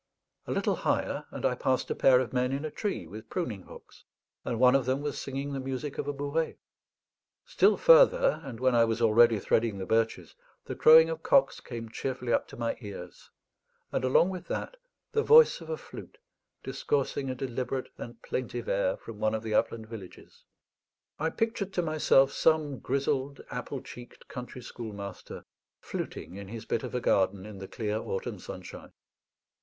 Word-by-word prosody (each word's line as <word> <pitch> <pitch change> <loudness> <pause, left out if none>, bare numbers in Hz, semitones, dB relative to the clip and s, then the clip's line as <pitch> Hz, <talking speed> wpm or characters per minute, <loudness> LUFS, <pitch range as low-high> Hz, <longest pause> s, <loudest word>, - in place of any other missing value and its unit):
A - - -3
little - - 0
higher, - - -1
and - - -5
I - - +3
passed 130 -1 0
a - - 0
pair 130 -2 +5
of 130 - -5
men 125 0 +1
in 140 +3 -2
a 155 - -4
tree 205 +4 -3
with 110 +2 -10
pruning 120 - -3
hooks, - - -15 0.4
and 115 - -3
one 125 0 +6
of 135 -2 +2
them 130 +2 +1
was 145 -1 -3
singing 140 +1 -4
the 135 - -3
music 135 +2 -4
of 145 - -3
a - - 0
bourrée. 145 +3 -2 0.9
Still - - +3
further, - - +6
and 120 -4 -8
when 130 0 +2
I 120 -1 +5
was 115 0 0
already 115 0 +5
threading 110 +1 +1
the 95 - -4
birches, 115 +1 0 0.3
the - - -4
crowing 160 +1 +7
of 160 0 -5
cocks 275 +8 +3
came 115 -2 -7
cheerfully 125 +1 -3
up - - +1
to - - -12
my 115 -1 -2
ears, 100 -5 -9 0.6
and - - -1
along 130 +7 +4
with 185 -2 -7
that - - -4 0.4
the 440 - +2
voice 470 +2 +6
of - - -10
a 475 - -2
flute - - -11 0.5
discoursing 140 -1 -1
a 130 - -2
deliberate 130 0 -3
and 120 -1 -8
plaintive 120 -1 -4
air 95 -1 +1
from 110 -2 -10
one 110 +1 +1
of 110 - -4
the 110 -1 -3
upland 115 0 +1
villages. 110 -5 -11 0.7
I 160 +2 +1
pictured 210 -1 -2
to 175 - 0
myself 150 -4 +4
some 150 -4 +1
grizzled, 140 +1 -1
apple - - -5
cheeked, 120 0 -12
country 125 0 -8
schoolmaster 100 -5 -8 0.3
fluting 95 - -6
in 100 -1 -8
his 115 +2 -8
bit 115 - -1
of - - -6
a 125 - -1
garden 95 -2 +1
in 105 -2 -9
the 95 - -7
clear 105 0 -3
autumn 95 - -4
sunshine. - - -9
125 Hz, 180 wpm, -29 LUFS, 115-145 Hz, 0.9 s, crowing